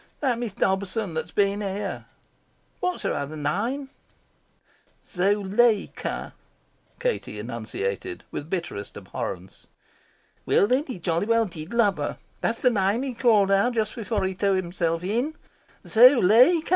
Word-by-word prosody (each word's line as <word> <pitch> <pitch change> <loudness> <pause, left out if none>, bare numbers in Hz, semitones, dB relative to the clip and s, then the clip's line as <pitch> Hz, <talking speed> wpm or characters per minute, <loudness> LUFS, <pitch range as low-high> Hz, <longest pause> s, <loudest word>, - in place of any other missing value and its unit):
"That 255 -5 0
Miss 235 -5 -3
Dobson 190 0 -1
that's 160 - -3
been 200 0 +1
here." 200 0 -4 0.7
"What's 360 0 -2
her - - 0
other 145 +2 -4
name?" 230 - -2 1.1
"Zuleika," 205 +3 +1 0.7
Katie - - -2
enunciated 105 -5 -4
with 150 - -6
bitterest 165 - -4
abhorrence. 95 0 -7 0.8
"Well, - - +3
then, 255 +7 +1
he 255 - -5
jolly 170 +2 -1
well 230 0 +3
did 165 -3 -8
love 215 -6 +3
her. 145 - -3 0.2
That's 230 - -1
the 250 - +5
name 205 +3 +1
he 270 -2 -3
called 220 -5 +3
out 200 +5 +3
just 215 -2 0
before 225 -3 -2
he 190 0 -1
threw 195 +1 +1
himself 170 -2 -1
in. 240 - -1 0.5
'Zuleika! 250 - +6
200 Hz, 135 wpm, -25 LUFS, 175-235 Hz, 1.1 s, Zuleika